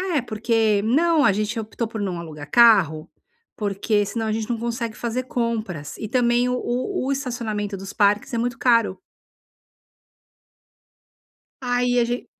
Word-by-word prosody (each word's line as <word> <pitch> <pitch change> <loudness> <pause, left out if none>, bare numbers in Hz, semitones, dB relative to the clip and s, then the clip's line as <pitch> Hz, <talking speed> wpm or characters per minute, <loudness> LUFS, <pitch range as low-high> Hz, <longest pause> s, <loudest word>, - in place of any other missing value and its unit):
"É 290 - +2
porque 220 -2 +1
não 300 +6 +3
a - - +6
gente 215 +3 -2
optou 220 +1 -4
por 220 -1 -6
não 190 -4 -2
alugar 150 -3 -9
carro, 190 -10 +5 0.5
porque 205 0 0
senão 225 +2 -3
a 215 - 0
gente 220 +1 -3
não 235 - 0
consegue 235 -1 -3
fazer 240 +2 -3
compras 225 - -3
e 215 - -5
também 240 +1 +2
o 250 - 0
o 255 +6 -2
o 275 - 0
estacionamento 230 -7 -3
dos 195 +1 -7
parques 205 +5 +1
é 235 - 0
muito 240 0 -1
caro." 230 -6 +2 2.7
Aí 245 0 +2
a - - +3
ge 240 +1 -3
230 Hz, 155 wpm, -23 LUFS, 205-245 Hz, 2.7 s, a